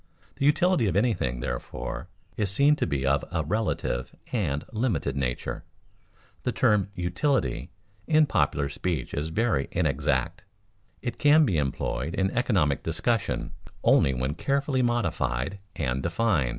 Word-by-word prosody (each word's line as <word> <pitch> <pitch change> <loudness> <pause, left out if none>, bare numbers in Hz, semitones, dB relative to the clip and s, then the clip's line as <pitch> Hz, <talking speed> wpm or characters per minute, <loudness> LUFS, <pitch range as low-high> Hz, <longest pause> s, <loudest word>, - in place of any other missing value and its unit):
The 140 - +2
utility 175 - +3
of 90 - 0
anything, 100 - +1
therefore, - - -4 0.3
is 105 -3 0
seen 140 +9 +4
to - - 0
be 70 -1 -1
of 70 +1 +2
a - - 0
relative 95 - -2 0.2
and 80 - -1
limited 105 - 0
nature. 65 -3 -2 0.8
The - - -1
term 100 -2 +2
"utility" 90 - 0 0.4
in 155 -1 +5
popular 70 - +1
speech 75 -1 -3
is 75 +2 -2
very 105 - +1
inexact. - - 0 0.6
It 120 -3 -4
can 150 +1 +6
be 90 - +1
employed 70 +2 -2
in 95 0 +1
economic 95 - +1
discussion 105 +8 -1 0.3
only 65 - +4
when 65 +3 -1
carefully 140 - 0
modified 100 - 0 0.2
and 65 -3 -1
defined. 85 - +1
90 Hz, 135 wpm, -27 LUFS, -, 0.8 s, can